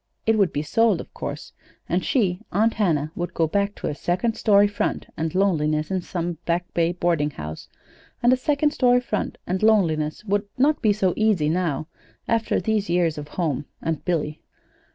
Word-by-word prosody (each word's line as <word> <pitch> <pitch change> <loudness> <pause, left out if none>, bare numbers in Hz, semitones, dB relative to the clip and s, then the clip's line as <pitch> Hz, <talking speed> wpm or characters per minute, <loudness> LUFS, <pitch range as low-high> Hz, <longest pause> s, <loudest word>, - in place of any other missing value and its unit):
It 225 - +4
would 200 -4 +3
be 145 - -2
sold, 215 +3 +2
of - - -9
course; - - -6 0.3
and 180 +2 0
she, 190 -9 +1
Aunt 220 +4 +2
Hannah, 160 -8 0
would 175 0 -4
go 165 - +3
back 200 +5 0
to - - -5
a - - -1
"second 185 +9 -1
story 205 -2 +4
front" 205 +1 -2
and 160 +1 -3
loneliness 155 -5 +1
in 190 -1 0
some 175 -2 -4
Back 175 +1 0
Bay 170 0 +2
boarding 170 -4 +1
house; 75 - -8 0.6
and 245 +1 +6
a - - +5
second 290 +3 +1
story 250 -3 +4
front 225 -4 -3
and 185 +1 -2
loneliness 170 -6 +2
would 205 0 0
not 290 +4 +3
be 210 -2 +3 0.2
easy 210 -9 +2
now, 160 -3 -1 0.4
after 230 -1 +1
these 215 -3 -1
years 170 -3 +1
of 145 - -7
home 150 -3 -2
and 160 -2 -3
Billy. 155 -4 -2
180 Hz, 180 wpm, -23 LUFS, 160-215 Hz, 0.6 s, and